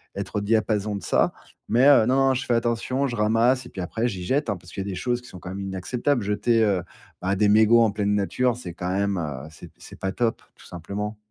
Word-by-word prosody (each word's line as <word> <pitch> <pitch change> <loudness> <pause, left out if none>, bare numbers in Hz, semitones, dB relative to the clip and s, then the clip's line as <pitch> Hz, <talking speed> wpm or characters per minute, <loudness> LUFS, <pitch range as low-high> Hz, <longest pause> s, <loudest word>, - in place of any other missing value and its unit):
être - - -4
au - - 0
diapason 105 -1 0
de 100 - -6
ça, - - +2 0.4
mais, 125 +4 +4
heu, 135 -6 +6
non, 130 - +3
non 130 - +3
je 130 - -2
fais 120 - +1
attention, 120 +3 0
je 125 -3 -3
ramasse 115 +4 +2
et - - -12
puis 95 - -7
après 110 +7 -2
j'y 95 -6 -5
jette, 135 - 0
hein. 100 - -1
Parce 90 0 -15
qu'il 95 - -4
y - - -7
a - - -3
des 95 - -4
choses 120 +5 -1
qui 125 - -15
sont 90 - -11
quand 90 - -8
même 95 +1 -5
inacceptables, 105 +7 -1
jeter, 115 +3 +2
heu, 100 -4 +2 0.4
bah, 95 +2 0
des 105 +1 +3
mégots 110 +2 +6
en 110 - +2
pleine 105 0 0
nature, 120 +5 0
c'est 90 -8 -7
quand 90 0 -4
même, 100 +1 0
heu, 75 -3 -5
c'est 75 - -12
p - - -22
c'est - - -13
pas 95 - -2
top, 115 +2 -1
tout - - -18
simplement. 100 +5 -5
105 Hz, 265 wpm, -24 LUFS, 95-120 Hz, 0.4 s, heu